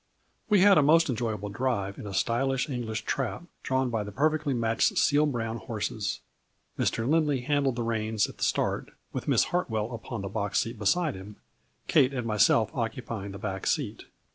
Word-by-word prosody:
We 205 -3 +5
had 195 -3 +7
a - - +5
most 155 +1 +4
enjoyable 110 -4 -2
drive 100 -3 -2
in 105 - -7
a 100 - -6
stylish 135 +6 +1
English 120 -6 -4
trap - - -2 0.2
drawn 130 -1 0
by 110 -2 -1
the 105 - -7
perfectly 150 +6 +1
matched 115 -3 +1
seal 150 +1 +4
brown 115 -4 -2
horses. 110 -3 -3 0.5
Mr. 115 +1 0
Lindley 150 -3 +2
handled 140 -1 +1
the 120 - -2
reins 110 -2 0
at - - -13
the - - -2
start, - - 0 0.2
with - - -4
Miss - - +4
Hartwell 115 -10 -1
upon 115 -2 -6
the - - -3
box 105 -1 -2
seat 115 -1 -1
beside 155 - +2
him, 95 +2 -10 0.5
Kate 135 +1 +4
and 125 -2 -2
myself 110 0 +3
occupy 115 -3 -4
ing - - -7
the - - -7
back 95 -1 -4
seat. - - -1
115 Hz, 185 wpm, -28 LUFS, 110-135 Hz, 0.5 s, had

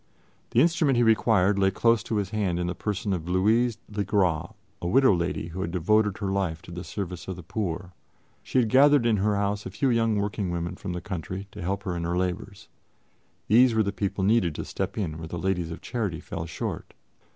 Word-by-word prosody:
The 120 - +3
instrument 160 -4 +3
he 120 - +4
required 105 -3 +3
lay 95 0 +4
close 115 +4 +2
to 110 - -2
his 100 -2 -1
hand 100 -5 0
in 90 - -1
the 90 - -2
person 100 +2 -2
of 85 -1 -4
Louise 110 +5 +2
le 105 -1 -2
Gras, 90 -5 +1 0.3
a 85 - -2
widow 130 +4 +5
lady 85 -1 -2
who 90 +3 -5
had 85 - -2
devoted 105 +4 +2
her 100 -3 -2
life 95 -5 -1
to - - -11
the 90 +1 -6
service 90 -4 -6
of 95 - -4
the 90 - -10
poor. 90 -1 -4 0.5
She - - -3
had 120 -3 +3
gathered 140 0 +5
in 115 -2 +3
her 105 +1 +1
house 100 +1 -1
a - - -5
few 130 +7 0
young 115 -2 +2
working 100 -1 -1
women 85 0 -3
from 95 -3 -5
the 90 - -4
country 95 +2 -5
to - - -9
help 95 +3 -2
her 90 -2 -3
in 85 - -3
her 85 +1 -1
labors; 95 +2 -3 0.8
these 120 +2 +5
were 110 - +4
the 100 - -1
people 100 0 -2
needed 100 -6 +2
to - - -4
step - - -4
in 80 -7 -3
where 80 - -6
the 85 - -5
Ladies 90 -2 -1
of 85 - -7
Charity 105 -10 -3
fell 80 +2 -6
short. 80 - -5
100 Hz, 225 wpm, -26 LUFS, 90-110 Hz, 0.8 s, widow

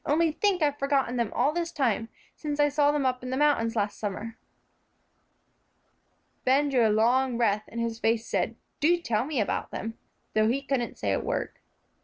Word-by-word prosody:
Only 320 +2 +2
think, 370 +1 +1
I've 290 -1 +1
forgotten 275 -3 +1
them 235 -3 0
all 275 +5 +1
this 340 0 -2
time, 230 -5 0 0.3
since 295 -1 -4
I 290 0 +5
saw 290 0 +3
them 295 -2 0
up 255 -1 0
in 250 - -6
the 260 - -1
mountains 280 -6 +2
last 205 -2 -1
summer." 215 +2 -4 2.1
Ben 280 +3 +3
drew 245 -5 +3
a - - +2
long 240 +4 +2
breath, 215 -3 +1
and 235 - -7
his 230 -1 -2
face 225 0 +1
said, 200 +3 -1 0.2
"Do 340 +4 +4
tell 235 -8 0
me 290 -3 -2
about 210 - -1
them," 225 +1 -6 0.3
though 215 0 +3
he 270 +4 0
couldn't 270 -4 -2
say - - -1
a - - +1
word. - - -2
255 Hz, 190 wpm, -27 LUFS, 225-290 Hz, 2.1 s, I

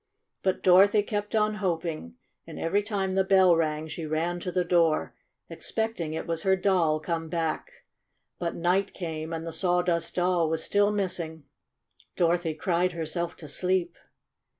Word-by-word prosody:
But 190 -1 -1
Dorothy 195 +3 +6
kept 205 0 -3
on 215 0 +2
hoping, 165 - -2 0.3
and - - -9
every 195 +5 +1
time 200 -2 -2
the 190 0 +3
bell 190 -2 +5
rang 155 -1 -1
she 160 0 -5
ran 165 +3 -1
to 180 - -4
the 180 0 0
door, 170 -3 +2 0.3
ex - - -7
pecting 220 -9 -2
it - - -4
was 165 -1 -2
her 190 +1 +3
Doll 180 -5 +2
come 165 0 -3
back. 165 - -2 0.7
But 170 -1 -2
night 185 +4 0
came, 160 -3 -5
and 165 0 -4
the 165 - -4
Sawdust 180 -2 0
Doll 175 -2 +2
was 160 0 -1
still 205 0 +2
missing. 175 -6 -3 0.7
Dorothy 170 -2 +1
cried 175 +2 0
herself 170 +1 -3
to 155 - -10
sleep. 180 +3 0
175 Hz, 160 wpm, -27 LUFS, 165-190 Hz, 0.7 s, Dorothy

